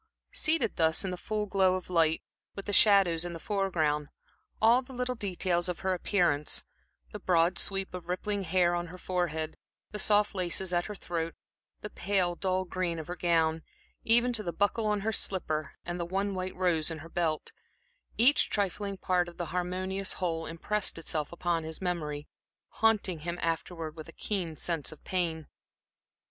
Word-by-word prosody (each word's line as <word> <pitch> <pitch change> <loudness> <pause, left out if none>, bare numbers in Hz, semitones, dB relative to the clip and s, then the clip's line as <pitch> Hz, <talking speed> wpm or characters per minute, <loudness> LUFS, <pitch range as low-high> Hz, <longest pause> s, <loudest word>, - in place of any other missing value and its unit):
Seated 310 -8 +1
thus 160 +2 +3
in 190 - -2
the - - -2
full 210 +3 -2
glow 190 -2 +3
of 185 - -5
light, 165 -3 +2 0.3
with 200 - -6
the 205 - -2
shadows 195 -6 +6
in 175 -1 -3
the 165 - -6
foreground, 160 -7 0 0.5
all 230 +3 +6
the 260 0 -11
little 250 0 -1
details 185 -5 0
of 180 - -3
her 190 -1 +1
appearance 175 -5 +1 0.5
the 210 - -6
broad 175 -2 +3
sweep 195 -1 -1
of 180 -2 -7
rippling 200 +3 -1
hair 180 -1 +2
on 175 0 -1
her 180 +2 -9
forehead, 170 -4 -2 0.3
the 210 - -3
soft 210 +1 +4
laces 185 0 0
at 175 0 +2
her 210 - -6
throat, 165 -3 -3 0.5
the 210 - -5
pale, 185 -2 +1
dull 185 +1 0
green 180 -2 -2
of 160 - -5
her 175 - -5
gown, 165 -2 +2 0.4
even 240 +2 +3
to 225 - +3
the 175 -4 -3
buckle 205 +5 +1
on 210 -1 +1
her 220 +2 0
slipper, 155 -7 -1
and 175 +1 -3
the 170 - -1
one 195 +3 -1
white 185 0 -3
rose 175 -4 +2
in 165 - -4
her 155 +1 -10
belt 165 -3 -1 0.7
each 255 +6 +5
trifling 200 0 -1
part 180 -1 +1
of 175 - -11
the 175 - -2
harmonious 185 +2 -1
whole, 165 -3 -2
impressed 190 +5 -1
itself 155 -2 -2
on 170 -2 +2
his 160 0 -4
memory, 155 -5 -3 0.5
haunting 210 -6 +3
him 170 +3 -4
afterwards 165 -1 -2
with 160 0 -9
a - - -11
keen 180 -6 -3
sense 165 -3 -1
of 155 - -13
pain. 165 -4 -1
180 Hz, 180 wpm, -30 LUFS, 165-200 Hz, 0.7 s, shadows